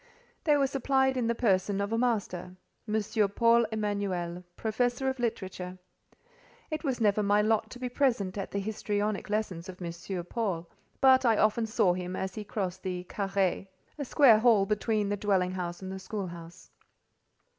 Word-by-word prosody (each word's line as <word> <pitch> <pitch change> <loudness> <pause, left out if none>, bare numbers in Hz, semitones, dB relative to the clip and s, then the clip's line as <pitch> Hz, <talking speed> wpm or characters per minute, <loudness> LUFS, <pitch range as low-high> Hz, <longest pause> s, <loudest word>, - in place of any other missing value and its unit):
They 300 -2 +5
were 280 - +3
supplied 265 0 +1
in 245 -3 0
the 235 - +1
person 200 -3 +1
of 200 +2 -1
a - - +1
master—M. 210 0 -1
Paul 235 0 +5
Emanuel, 200 -5 -2
professor 245 +4 0
of 265 -1 -4
literature. 190 -5 -3 0.9
It 310 +2 -3
was 265 -5 -1
never 210 -2 +3
my 205 +1 +3
lot 220 0 +1
to - - -9
be 250 0 -3
present 240 -7 0
at 195 -2 -4
the - - -4
histrionic 205 0 -2
lessons 195 -4 -2
of 185 - -9
M. 170 -2 -4 0.3
Paul, 180 -5 -2 0.3
but 260 -1 +6
I 230 -3 +4
often 215 +1 +2
saw 190 -4 +3
him 180 0 -4
as 190 0 -3
he 215 - -5
crossed 190 -3 -4
the 180 -2 -3
carré 195 -1 -1 0.3
(a - - -1
square 250 -4 +6
hall 220 -4 +5
between 210 0 0
the 205 - -1
dwelling 190 -3 +1
house 180 -1 -5
and 190 0 -6
school 200 0 -4
house). 170 0 -11
210 Hz, 165 wpm, -29 LUFS, 185-230 Hz, 0.9 s, but